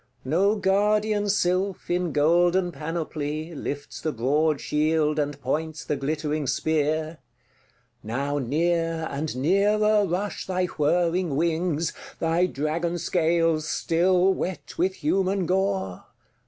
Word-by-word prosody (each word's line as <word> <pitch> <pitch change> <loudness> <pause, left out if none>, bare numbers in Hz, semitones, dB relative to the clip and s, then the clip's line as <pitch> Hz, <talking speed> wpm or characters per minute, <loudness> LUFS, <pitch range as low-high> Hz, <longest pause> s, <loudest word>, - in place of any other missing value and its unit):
No 190 +10 +2
guardian 205 +1 +1
sylph, 190 0 0
in 175 -1 0
golden 175 +4 +3
panoply, 155 0 -4
Lifts 145 -1 -6
the 155 - -1
broad 145 +5 +1
shield, 155 0 +1
and 145 -1 -2
points 155 +4 -3
the 150 - -1
glittering 150 +1 -2
spear. 155 +3 0 0.8
Now 140 +6 -2
near 165 +4 0
and 140 -1 -3
nearer 205 +7 +3
rush 185 +4 -3
thy 185 -1 0
whirring 170 0 +1
wings, 165 0 0 0.2
Thy 165 +2 +2
dragon 165 +3 -2
scales 165 -2 +1
still 180 +3 +2
wet 185 -1 -5
with 185 +2 +1
human 190 +4 0
gore. 190 - -1
165 Hz, 115 wpm, -25 LUFS, 150-185 Hz, 0.8 s, golden